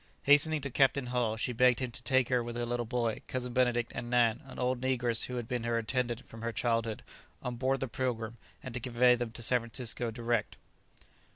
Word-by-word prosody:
Hastening 145 Hz, +2 st, +5 dB
to 140 Hz, -1 st, -5 dB
Captain 135 Hz, 0 st, +3 dB
Hull, 115 Hz, -3 st, 0 dB
she 125 Hz, +2 st, -1 dB
begged 125 Hz, +1 st, +4 dB
him 130 Hz, -2 st, -3 dB
to 125 Hz, -, -4 dB
take 130 Hz, +1 st, +2 dB
her 125 Hz, -2 st, +2 dB
with 120 Hz, 0 st, -6 dB
her 120 Hz, 0 st, -2 dB
little 120 Hz, -1 st, -2 dB
boy, 115 Hz, -2 st, -1 dB
Cousin 125 Hz, -1 st, -4 dB
Benedict, 120 Hz, -2 st, +1 dB
and 120 Hz, -, -5 dB
Nan, 120 Hz, -1 st, +3 dB
an 135 Hz, -, -11 dB
old 125 Hz, 0 st, 0 dB
negress 120 Hz, -3 st, +1 dB
who 125 Hz, -, -5 dB
had 120 Hz, -2 st, -4 dB
been 125 Hz, -1 st, -2 dB
her 115 Hz, 0 st, 0 dB
attendant 120 Hz, +1 st, -1 dB
from 115 Hz, -, -12 dB
her 115 Hz, 0 st, -2 dB
childhood, 115 Hz, -2 st, -1 dB, 0.4 s
on 125 Hz, -1 st, -3 dB
board 135 Hz, +2 st, 0 dB
the 135 Hz, -, -1 dB
"Pilgrim," 115 Hz, -2 st, -3 dB, 0.2 s
and 130 Hz, -, -7 dB
to 125 Hz, -, -2 dB
convey 125 Hz, +1 st, +4 dB
them 120 Hz, -1 st, -2 dB
to 120 Hz, +1 st, -5 dB
San 125 Hz, +3 st, +3 dB
Francisco 115 Hz, 0 st, -1 dB
direct. 115 Hz, -1 st, -2 dB
120 Hz, 215 wpm, -31 LUFS, 115-125 Hz, 0.4 s, Hastening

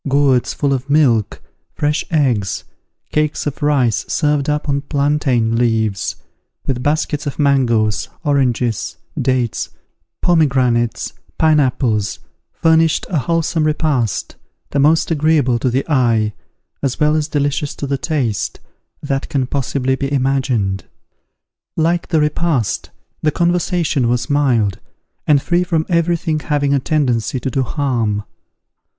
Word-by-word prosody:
Gourds 135 Hz, -3 st, +3 dB
full 140 Hz, -1 st, 0 dB
of 135 Hz, +1 st, -3 dB
milk, 130 Hz, -8 st, +2 dB, 0.3 s
fresh 150 Hz, +1 st, 0 dB
eggs, 125 Hz, -, 0 dB, 0.5 s
cakes 150 Hz, 0 st, 0 dB
of 145 Hz, 0 st, -4 dB
rice 140 Hz, -6 st, +2 dB
served 150 Hz, -2 st, +1 dB
up 150 Hz, +1 st, -1 dB
on 140 Hz, -1 st, 0 dB
plantain 140 Hz, -5 st, +1 dB
leaves, 110 Hz, -4 st, 0 dB, 0.5 s
with 125 Hz, -2 st, -2 dB
baskets 150 Hz, 0 st, -1 dB
of 140 Hz, -, -4 dB
mangoes, 120 Hz, -7 st, +2 dB
oranges, 125 Hz, -, 0 dB, 0.2 s
dates, 125 Hz, -3 st, 0 dB, 0.5 s
pomegranates, 130 Hz, -8 st, +2 dB, 0.2 s
pineapples, 130 Hz, -9 st, +2 dB, 0.3 s
furnished 160 Hz, -1 st, +2 dB
a 165 Hz, -, +2 dB
wholesome 160 Hz, +3 st, 0 dB
repast, 150 Hz, -, 0 dB, 0.4 s
the 140 Hz, -, 0 dB
most 155 Hz, +4 st, +3 dB
agreeable 150 Hz, -6 st, +2 dB
to 125 Hz, -, +1 dB
the 130 Hz, +3 st, -1 dB
eye, 115 Hz, -7 st, +2 dB, 0.5 s
as 135 Hz, 0 st, -2 dB
well 150 Hz, 0 st, +3 dB
as 155 Hz, -1 st, 0 dB
delicious 145 Hz, -1 st, -1 dB
to -, -, -4 dB
the 140 Hz, -1 st, -2 dB
taste, 130 Hz, -11 st, -2 dB, 0.4 s
that 135 Hz, -1 st, -2 dB
can 140 Hz, -5 st, 0 dB
possibly 135 Hz, 0 st, -1 dB
be 135 Hz, +1 st, -2 dB
imagined. 130 Hz, -8 st, 0 dB, 0.9 s
Like 170 Hz, +2 st, +1 dB
the 160 Hz, -, +2 dB
repast, 150 Hz, -, 0 dB, 0.3 s
the 155 Hz, -, +2 dB
conversation 170 Hz, -5 st, +1 dB
was 120 Hz, +3 st, -1 dB
mild, 120 Hz, -9 st, +2 dB, 0.5 s
and 145 Hz, -2 st, +5 dB
free 175 Hz, +5 st, +1 dB
from 165 Hz, -3 st, 0 dB
every 170 Hz, 0 st, +2 dB
thing 155 Hz, -1 st, -1 dB
having 145 Hz, -2 st, 0 dB
a 140 Hz, -, +3 dB
tendency 130 Hz, -4 st, 0 dB
to 130 Hz, -, -3 dB
do 135 Hz, -, 0 dB
harm. 120 Hz, -6 st, -1 dB
140 Hz, 130 wpm, -18 LUFS, 125-150 Hz, 0.9 s, and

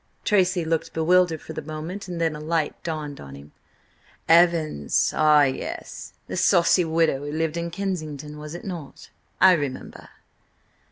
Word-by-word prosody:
Tracy 185 Hz, -4 st, +2 dB
looked 160 Hz, 0 st, -2 dB
bewildered 165 Hz, 0 st, +2 dB
for -, -, -8 dB
the -, -, -5 dB
moment, 160 Hz, +6 st, -7 dB
and 175 Hz, -2 st, -5 dB
then 165 Hz, -2 st, 0 dB
a -, -, -7 dB
light 155 Hz, 0 st, -1 dB
dawned 155 Hz, -3 st, -5 dB
on 70 Hz, 0 st, -10 dB
him. 70 Hz, +1 st, -13 dB, 0.8 s
"Evans! 165 Hz, -, +3 dB
Ah, 150 Hz, -1 st, +5 dB
yes! 130 Hz, -2 st, -4 dB
The -, -, -6 dB
saucy 175 Hz, +1 st, +4 dB
widow 160 Hz, -3 st, +1 dB
who 145 Hz, +1 st, -6 dB
lived 160 Hz, +1 st, -1 dB
in 170 Hz, 0 st, -3 dB
Kensington, 155 Hz, -6 st, -5 dB
was 150 Hz, +2 st, -8 dB
it -, -, -9 dB
not? 170 Hz, -7 st, -8 dB, 0.3 s
I 190 Hz, -, +7 dB
remember." 145 Hz, -7 st, -3 dB
160 Hz, 155 wpm, -24 LUFS, 150-175 Hz, 0.8 s, I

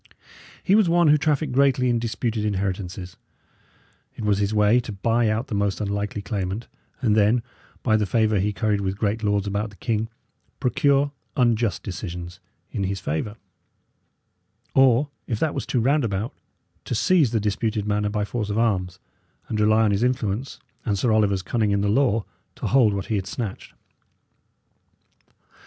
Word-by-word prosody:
He 195 Hz, -, +2 dB
was 210 Hz, -4 st, +5 dB
one 170 Hz, -2 st, +4 dB
who 150 Hz, -, +6 dB
trafficked 150 Hz, -1 st, 0 dB
greatly 135 Hz, -1 st, +3 dB
in 120 Hz, -1 st, +2 dB
disputed 115 Hz, -1 st, -2 dB
inheritances; 95 Hz, -2 st, -3 dB, 1.0 s
it -, -, -7 dB
was 100 Hz, -1 st, +2 dB
his 100 Hz, 0 st, 0 dB
way 105 Hz, +2 st, +4 dB
to 120 Hz, -, -5 dB
buy 115 Hz, +3 st, +1 dB
out 110 Hz, +3 st, 0 dB
the 135 Hz, -, -7 dB
most 100 Hz, -1 st, 0 dB
unlikely 100 Hz, 0 st, -3 dB
claimant, 100 Hz, +1 st, -3 dB, 0.4 s
and 110 Hz, -4 st, +3 dB
then, 110 Hz, +3 st, +3 dB, 0.4 s
by 110 Hz, -3 st, +3 dB
the 105 Hz, -2 st, 0 dB
favour 110 Hz, -1 st, +2 dB
he 105 Hz, +3 st, +1 dB
curried 105 Hz, 0 st, 0 dB
with 95 Hz, 0 st, -2 dB
great 105 Hz, +1 st, -1 dB
lords 105 Hz, -2 st, +1 dB
about 100 Hz, +2 st, -2 dB
the 100 Hz, -, -16 dB
king, 110 Hz, 0 st, -2 dB, 0.5 s
procure 140 Hz, +2 st, +2 dB, 0.3 s
unjust 120 Hz, -4 st, +1 dB
decisions 85 Hz, -2 st, -6 dB, 0.3 s
in 100 Hz, -4 st, -2 dB
his 95 Hz, 0 st, -2 dB
favour; 80 Hz, +8 st, -3 dB, 1.4 s
or, 135 Hz, +1 st, +4 dB, 0.2 s
if 110 Hz, -4 st, -2 dB
that 155 Hz, -2 st, 0 dB
was -, -, -4 dB
too 125 Hz, -, +1 dB
roundabout, 115 Hz, -5 st, 0 dB, 0.5 s
to 120 Hz, -, -2 dB
seize 155 Hz, +3 st, +3 dB
the 115 Hz, -1 st, 0 dB
disputed 105 Hz, +1 st, -1 dB
manor 105 Hz, 0 st, 0 dB
by 105 Hz, -1 st, -1 dB
force 105 Hz, -1 st, -3 dB
of 105 Hz, -, -1 dB
arms, 95 Hz, -6 st, 0 dB, 0.5 s
and 110 Hz, -, -2 dB
rely 110 Hz, +1 st, +4 dB
on 105 Hz, -, +3 dB
his 100 Hz, +1 st, 0 dB
influence 125 Hz, -1 st, -1 dB, 0.2 s
and 105 Hz, -4 st, 0 dB
Sir 115 Hz, +4 st, +1 dB
Oliver's 100 Hz, -3 st, +2 dB
cunning 110 Hz, -1 st, 0 dB
in 100 Hz, 0 st, +1 dB
the 100 Hz, -, +1 dB
law 115 Hz, -2 st, +2 dB, 0.3 s
to -, -, -6 dB
hold 120 Hz, -6 st, +4 dB
what 100 Hz, -, -3 dB
he 110 Hz, -, -1 dB
had 95 Hz, -1 st, -3 dB
snatched. 110 Hz, -1 st, -6 dB
110 Hz, 170 wpm, -24 LUFS, 100-120 Hz, 1.4 s, who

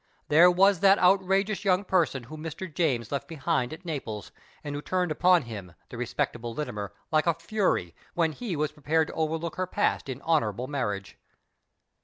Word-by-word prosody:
There 165 Hz, +4 st, +7 dB
was 190 Hz, +1 st, +4 dB
that 195 Hz, +2 st, +6 dB
outrageous 195 Hz, +3 st, +2 dB
young 190 Hz, -1 st, +3 dB
person 170 Hz, -9 st, +1 dB
whom 155 Hz, +5 st, -10 dB
Mr. 165 Hz, +3 st, -5 dB
James 130 Hz, -9 st, 0 dB
left 140 Hz, -1 st, -3 dB
behind 155 Hz, -4 st, -1 dB
at 165 Hz, +4 st, -9 dB
Naples 115 Hz, -, -5 dB, 0.3 s
and 145 Hz, -, -5 dB
who 145 Hz, -, -4 dB
turned 180 Hz, 0 st, -1 dB
upon 180 Hz, +2 st, +4 dB
him, 100 Hz, -7 st, -8 dB
the -, -, -9 dB
respectable 120 Hz, -1 st, -3 dB
Littimer, 105 Hz, -9 st, -4 dB, 0.2 s
like 155 Hz, +1 st, +2 dB
a 170 Hz, -, +3 dB
fury, 185 Hz, -, -1 dB, 0.2 s
when 165 Hz, -2 st, +2 dB
he 195 Hz, +2 st, -4 dB
was 150 Hz, 0 st, -1 dB
prepared 155 Hz, +1 st, 0 dB
to -, -, -7 dB
overlook 160 Hz, +1 st, -2 dB
her 185 Hz, 0 st, -1 dB
past 205 Hz, -6 st, 0 dB
in 130 Hz, -1 st, -4 dB
honourable 125 Hz, -8 st, +1 dB
marriage. 105 Hz, -8 st, -4 dB
155 Hz, 175 wpm, -27 LUFS, 130-180 Hz, 0.3 s, There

